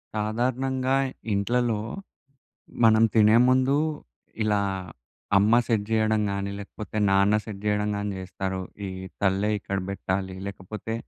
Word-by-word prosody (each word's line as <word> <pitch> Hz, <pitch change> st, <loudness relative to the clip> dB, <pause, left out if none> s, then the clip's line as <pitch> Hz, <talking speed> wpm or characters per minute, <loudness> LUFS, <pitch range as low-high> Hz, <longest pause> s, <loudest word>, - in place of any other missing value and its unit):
సాధారణంగా 130 Hz, +4 st, 0 dB, 0.4 s
ఇంట్లలో. 115 Hz, +2 st, +1 dB, 1.0 s
మనం 110 Hz, 0 st, +6 dB
తినే 110 Hz, 0 st, +6 dB
ముందు 130 Hz, +2 st, +3 dB, 0.7 s
ఇలా, 105 Hz, -1 st, +2 dB, 0.8 s
అమ్మ 105 Hz, +3 st, +4 dB
సెట్ 110 Hz, -4 st, +1 dB
చేయడం 110 Hz, -1 st, +2 dB
గానీ 100 Hz, 0 st, -3 dB
లేకపోతే 105 Hz, +1 st, -7 dB
నాన్న 100 Hz, +2 st, +4 dB
సెట్ 100 Hz, -3 st, -8 dB
చేయడం 105 Hz, 0 st, +1 dB
గానీ 105 Hz, 0 st, -2 dB
చేస్తారు. 95 Hz, 0 st, -4 dB, 0.3 s
ఈ -, -, -5 dB, 0.3 s
తల్లే 100 Hz, +1 st, +2 dB
ఇక్కడ 100 Hz, +1 st, -3 dB
పెట్టాలి. 95 Hz, -1 st, -3 dB
లేకపోతే, 100 Hz, +3 st, -6 dB
105 Hz, 115 wpm, -26 LUFS, 100-115 Hz, 1.0 s, మనం